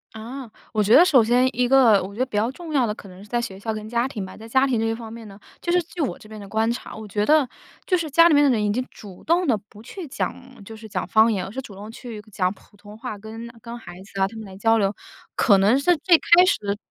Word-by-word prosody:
啊， 235 Hz, +3 st, -8 dB, 0.2 s
我 215 Hz, -2 st, +1 dB
觉 210 Hz, +3 st, +5 dB
得 340 Hz, -, +9 dB
首 275 Hz, -9 st, +5 dB
先 245 Hz, +3 st, +3 dB
一 245 Hz, +1 st, +1 dB
个， 245 Hz, -6 st, +5 dB
我 190 Hz, +2 st, -7 dB
觉 230 Hz, -, -10 dB
得 -, -, +3 dB
比 215 Hz, -5 st, -5 dB
较 225 Hz, +3 st, +1 dB
重 335 Hz, 0 st, -9 dB
要 260 Hz, -6 st, +2 dB
的 210 Hz, -, -3 dB
可 195 Hz, -, -12 dB
能 185 Hz, +1 st, -13 dB
是 205 Hz, -, -13 dB
在 240 Hz, +2 st, -1 dB
学 195 Hz, -5 st, -6 dB
校 220 Hz, +1 st, -3 dB
跟 215 Hz, 0 st, -7 dB
家 235 Hz, +2 st, 0 dB
庭 210 Hz, -7 st, -6 dB
吧。 185 Hz, -, -11 dB
在 220 Hz, +1 st, -11 dB
家 265 Hz, +3 st, +3 dB
庭 250 Hz, -5 st, 0 dB
这 225 Hz, 0 st, 0 dB
方 225 Hz, -1 st, -9 dB
面 230 Hz, -1 st, -10 dB
呢， 195 Hz, -1 st, -12 dB, 0.2 s
就 345 Hz, -, -1 dB
是 355 Hz, -1 st, +3 dB
据 335 Hz, +1 st, -13 dB
我 285 Hz, -, -1 dB
这 215 Hz, -, -16 dB
边 215 Hz, -, -9 dB
的 200 Hz, -, -10 dB
观 220 Hz, +2 st, 0 dB
察， 240 Hz, -, -7 dB
我 220 Hz, 0 st, -8 dB
觉 205 Hz, +1 st, -1 dB
得， 295 Hz, -2 st, +3 dB, 0.4 s
就 365 Hz, -, +2 dB
是 320 Hz, -2 st, -3 dB
家 335 Hz, +4 st, +6 dB
里 -, -, +4 dB
面 290 Hz, -, +5 dB
的 285 Hz, -, +4 dB
人 220 Hz, -4 st, +1 dB
已 205 Hz, -, +1 dB
经 250 Hz, +4 st, -1 dB
主 195 Hz, -4 st, -13 dB
动 345 Hz, +2 st, +2 dB
地 240 Hz, -7 st, +2 dB
不 210 Hz, +2 st, -16 dB
去 335 Hz, +5 st, -8 dB
讲， 255 Hz, -3 st, -6 dB
就 220 Hz, +3 st, -10 dB
是 220 Hz, 0 st, -11 dB
讲 190 Hz, -3 st, -3 dB
方 220 Hz, +4 st, +4 dB
言， 185 Hz, -3 st, -2 dB
而 -, -, -8 dB
是 265 Hz, +5 st, -5 dB
主 210 Hz, -7 st, -12 dB
动 210 Hz, +3 st, -9 dB
去 225 Hz, -3 st, -9 dB
讲 185 Hz, 0 st, 0 dB
普 205 Hz, +1 st, -23 dB
通 205 Hz, +1 st, -13 dB
话， 225 Hz, -3 st, -6 dB
跟 225 Hz, +3 st, -9 dB
跟 235 Hz, 0 st, -8 dB
孩 180 Hz, -5 st, -11 dB
子 195 Hz, -1 st, -6 dB
啊， -, -, +5 dB
他 220 Hz, +3 st, -7 dB
们 220 Hz, -, -8 dB
来 190 Hz, -1 st, -11 dB
交 225 Hz, +3 st, +2 dB
流。 200 Hz, -1 st, 0 dB, 0.4 s
可 200 Hz, -4 st, +4 dB
能 205 Hz, +6 st, +4 dB
是 325 Hz, +4 st, +2 dB
最 340 Hz, +2 st, +5 dB
开 350 Hz, +3 st, +5 dB
始 205 Hz, -, 0 dB
225 Hz, 320 characters per minute, -23 LUFS, 205-260 Hz, 0.4 s, 得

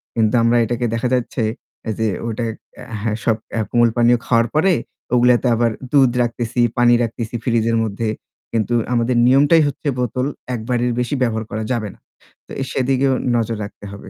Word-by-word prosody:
কিন্তু 110 Hz, -2 st, +2 dB
আমরা 115 Hz, +1 st, +3 dB
এটাকে 120 Hz, +1 st, -2 dB
দেখা 115 Hz, +2 st, 0 dB
যাচ্ছে 125 Hz, -1 st, -1 dB, 0.6 s
যে 110 Hz, -, +1 dB, 0.2 s
ওটা 115 Hz, +1 st, -2 dB, 0.3 s
অ্যা -, -, -10 dB, 0.2 s
হ্যাঁ, 110 Hz, 0 st, -1 dB
সব 115 Hz, -, +2 dB, 0.3 s
কোমল 120 Hz, -1 st, +4 dB
পানীয় 120 Hz, 0 st, +4 dB
খাওয়ার 115 Hz, -1 st, +3 dB
পরে 185 Hz, +5 st, +4 dB, 0.4 s
ওগুলাতে 125 Hz, +1 st, +4 dB
আবার 115 Hz, 0 st, +2 dB, 0.2 s
দুধ 135 Hz, -4 st, +5 dB
রাখতেছি, 120 Hz, 0 st, -3 dB, 0.2 s
পানি 120 Hz, 0 st, +5 dB
রাখতেছি 115 Hz, 0 st, -4 dB
ফ্রিজের 115 Hz, -1 st, +1 dB
মধ্যে। 110 Hz, +1 st, -2 dB, 0.4 s
কিন্তু 115 Hz, +1 st, -1 dB, 0.2 s
আমাদের 120 Hz, +1 st, +1 dB
নিয়মটাই 145 Hz, +5 st, +5 dB
হচ্ছে 145 Hz, +1 st, -5 dB
বোতল 125 Hz, +1 st, -1 dB, 0.3 s
একবারের 120 Hz, +1 st, -1 dB
বেশি 125 Hz, +4 st, -1 dB
ব্যবহার 110 Hz, -3 st, 0 dB
করা 110 Hz, 0 st, -3 dB
যাবে 115 Hz, -4 st, -1 dB
না। -, -, -27 dB, 0.5 s
তো -, -, -16 dB, 0.2 s
সেদিকেও 135 Hz, +1 st, +1 dB, 0.2 s
নজর 115 Hz, -1 st, -1 dB
রাখতে 100 Hz, 0 st, -10 dB
হবে। 100 Hz, -1 st, -10 dB
120 Hz, 160 wpm, -19 LUFS, 115-125 Hz, 0.6 s, দুধ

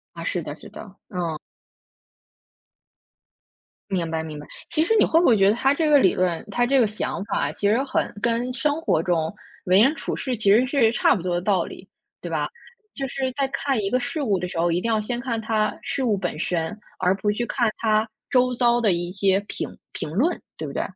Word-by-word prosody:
啊， -, -, -6 dB
是 -, -, -1 dB
的 -, -, -6 dB
是 -, -, -13 dB
的， -, -, -10 dB, 0.3 s
嗯。 170 Hz, -4 st, -3 dB, 2.5 s
明 175 Hz, -4 st, -1 dB
白 160 Hz, 0 st, -2 dB
明 155 Hz, -2 st, -7 dB
白。 150 Hz, -, -11 dB, 0.2 s
其 315 Hz, -, +2 dB
实 445 Hz, +6 st, +2 dB
你 -, -, +6 dB
会 325 Hz, -, +3 dB
不 345 Hz, -, +3 dB
会 230 Hz, -4 st, +5 dB
觉 195 Hz, 0 st, +5 dB
得 -, -, +4 dB
他 270 Hz, +3 st, +3 dB
这 310 Hz, +1 st, +1 dB
个 290 Hz, -2 st, +7 dB
理 190 Hz, -, +4 dB
论， 180 Hz, -2 st, 0 dB
他 245 Hz, -, +2 dB
这 270 Hz, +2 st, +3 dB
个 230 Hz, -, +4 dB
想 210 Hz, -2 st, -3 dB
法 -, -, -1 dB
其 200 Hz, -, -1 dB
实 240 Hz, +6 st, +2 dB
很 280 Hz, -, -1 dB
跟 235 Hz, +2 st, 0 dB
生 295 Hz, +6 st, 0 dB
活 160 Hz, -, +2 dB
中 165 Hz, -2 st, 0 dB, 0.3 s
为 185 Hz, +3 st, +5 dB
人 270 Hz, +6 st, +5 dB
处 -, -, -4 dB
事 255 Hz, -2 st, -2 dB
其 205 Hz, -2 st, +3 dB
实 230 Hz, +5 st, +5 dB
是 250 Hz, -4 st, +3 dB
差 240 Hz, -, +3 dB
不 180 Hz, -, -4 dB
多 180 Hz, -1 st, -1 dB
的 175 Hz, -, -1 dB
道 190 Hz, -2 st, +2 dB
理， -, -, -11 dB, 0.3 s
对 -, -, -6 dB
吧？ -, -, -1 dB, 0.5 s
就 275 Hz, -1 st, -3 dB
是 260 Hz, 0 st, -2 dB
在 275 Hz, -1 st, 0 dB
看 275 Hz, -1 st, -1 dB
一 195 Hz, -, -1 dB
个 255 Hz, +3 st, +2 dB
事 300 Hz, +5 st, -3 dB
物 205 Hz, -8 st, +1 dB
的 180 Hz, -, -3 dB
时 175 Hz, -, -7 dB
候， 170 Hz, +1 st, +2 dB
一 170 Hz, -, +1 dB
定 230 Hz, -, -1 dB
要 220 Hz, -, +2 dB
先 240 Hz, +3 st, -3 dB
看 240 Hz, -3 st, -2 dB
它 215 Hz, -1 st, 0 dB
事 270 Hz, -, -2 dB
物 215 Hz, -4 st, +2 dB
本 -, -, -3 dB
身， 175 Hz, +4 st, -2 dB, 0.2 s
而 180 Hz, 0 st, +3 dB
不 200 Hz, +2 st, -1 dB
去 240 Hz, +3 st, -2 dB
看 235 Hz, -3 st, +1 dB
它 215 Hz, -1 st, +2 dB, 0.2 s
周 250 Hz, -1 st, +3 dB
遭 240 Hz, -1 st, +3 dB
的 215 Hz, -6 st, +3 dB
一 175 Hz, +1 st, -2 dB
些 195 Hz, 0 st, +2 dB
评 -, -, -5 dB
评 -, -, -5 dB
论， 275 Hz, -, +1 dB, 0.2 s
对 -, -, -5 dB
不 -, -, -7 dB
对？ -, -, -1 dB
220 Hz, 250 characters per minute, -23 LUFS, 185-255 Hz, 2.5 s, 个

